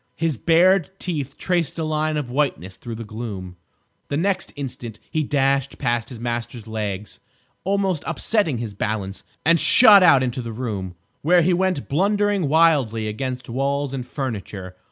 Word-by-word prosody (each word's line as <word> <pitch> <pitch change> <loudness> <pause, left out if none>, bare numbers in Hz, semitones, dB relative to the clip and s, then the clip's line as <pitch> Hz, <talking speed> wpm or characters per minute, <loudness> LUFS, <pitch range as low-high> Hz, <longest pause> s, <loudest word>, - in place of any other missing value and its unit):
His 165 -2 0
bared 175 - +4
teeth 145 -8 -4
traced 175 -5 -1
a 165 - -1
line 155 0 0
of 135 -5 -4
whiteness 125 - -1
through 115 -2 -7
the 115 - -6
gloom. 105 -5 -7 0.5
The 145 - -2
next 190 +3 0
instant 125 -5 -6
he 155 - 0
dashed 140 -1 +1
past 120 -2 -1
his 120 - -9
master's 120 -1 -4
legs, 105 -2 -5 0.5
almost 195 -4 0
upsetting 165 - 0
his 115 -3 -5
balance, 100 -2 -3 0.2
and 165 +1 +5
shot 215 -5 +8
out 140 -7 +6
into 125 0 -2
the 115 -1 -6
room, 105 -7 -4 0.3
where 175 +3 +4
he 180 +2 +3
went 185 -4 0
blundering 200 +2 +1
wildly 140 -9 +3
against 125 +3 -4
walls 140 +3 -1
and 130 -2 -3
furniture. 100 - -5
135 Hz, 155 wpm, -22 LUFS, 115-165 Hz, 0.5 s, shot